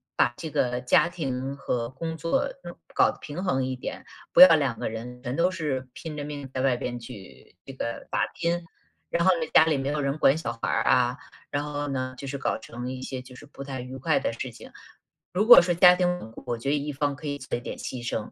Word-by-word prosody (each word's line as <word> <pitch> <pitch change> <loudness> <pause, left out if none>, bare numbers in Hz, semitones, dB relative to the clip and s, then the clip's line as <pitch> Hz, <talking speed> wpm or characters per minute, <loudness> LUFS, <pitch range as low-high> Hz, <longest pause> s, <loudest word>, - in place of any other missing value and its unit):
把 120 - +3
这 160 - -5
个 125 -2 0
家 150 +6 +4
庭 135 -5 -3
和 120 -3 -2
工 160 +5 -5
作 165 - 0 0.4
搞 - - +4
得 - - -14
平 155 +5 -6
衡 135 -9 +1
一 130 0 -2
点， 125 - -7 0.3
不 - - +7
要 180 -3 +11
2 140 -6 0
个 - - -2
人 120 +3 -7
全 125 +2 -3
都 170 +2 +3
是 145 -7 -3
拼 160 -2 -7
着 145 - -4
命 145 -2 -6
在 130 - -1
外 130 -2 +3
边 120 0 -4
去 110 -8 -12
这 135 - -9
个 115 -2 -5
打 - - +1
拼。 170 0 -1 0.4
然 170 0 +1
后 190 - +7
呢， 160 - -1
家 - - +8
里 160 -2 +1
没 135 0 -3
有 150 +1 -1
人 140 +1 -1
管 150 0 +4
小 140 -8 -3
孩 - - -1
儿 - - +1
啊， 125 +1 +3 0.3
然 145 0 -1
后 145 0 -3
呢， 130 -2 -3
就 140 - -7
是 140 +1 -4
搞 - - -1
成 120 +3 -6
一 130 0 -6
些 130 -1 -5
就 125 0 -14
是 - - -12
不 140 -1 -10
太 135 -1 -6
愉 125 +1 -7
快 150 +4 +1
的 - - -2
事 120 +2 -5
情。 - - -13 0.6
如 205 +4 +1
果 240 - +11
说 175 0 +1
家 180 +1 +7
庭 180 0 +1
稳 110 - -9
固， - - -11
我 120 -2 -2
觉 115 - -7
得 145 - +3
一 145 +1 -2
方 145 0 -1
可 145 - -12
以 145 -1 -2
做 130 - -4
一 120 - -8
点 - - -6
牺 120 -2 -6
牲， 110 -2 -3
135 Hz, 270 characters per minute, -26 LUFS, 125-155 Hz, 0.6 s, 要